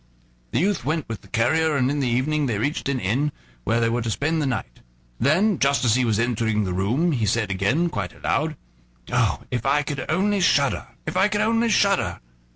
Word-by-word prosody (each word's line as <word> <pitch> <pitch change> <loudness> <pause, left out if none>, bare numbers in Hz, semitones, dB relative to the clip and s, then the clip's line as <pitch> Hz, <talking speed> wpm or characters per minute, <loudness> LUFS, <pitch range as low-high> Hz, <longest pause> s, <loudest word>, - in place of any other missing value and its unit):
The - - -2
youth 190 -2 0
went 155 +3 -2
with 115 -3 -6
the - - -17
carrier, 150 +6 +1
and 130 0 +1
in 145 - -1
the 135 - 0
evening 140 +5 0
they 115 -4 -1
reached 140 +5 -2
an 135 -2 0
inn, 125 +10 0 0.3
where 115 - +1
they 115 - +2
were 120 +1 0
to 115 - -3
spend 155 +8 0
the 145 - 0
night. 100 - -4 0.4
Then, 175 - +2
just 140 -1 +2
as 115 - +4
he 125 +1 +2
was 110 -3 +1
entering 115 -2 0
the 90 -2 -2
room, 120 - +1
he 115 -7 0
said 105 -1 0
again, 100 - +1
quite 100 - -4
aloud: 155 0 -1 0.6
"Oh! - - +1
if 120 -2 -2
I 145 +2 +2
could 145 -2 -4
only 200 +5 +1
shudder! 140 -6 +2 0.2
if 155 - -4
I 190 +2 +4
could 210 -1 -1
only 230 +1 +2
shudder!" 200 -3 +2
140 Hz, 215 wpm, -23 LUFS, 115-160 Hz, 0.6 s, as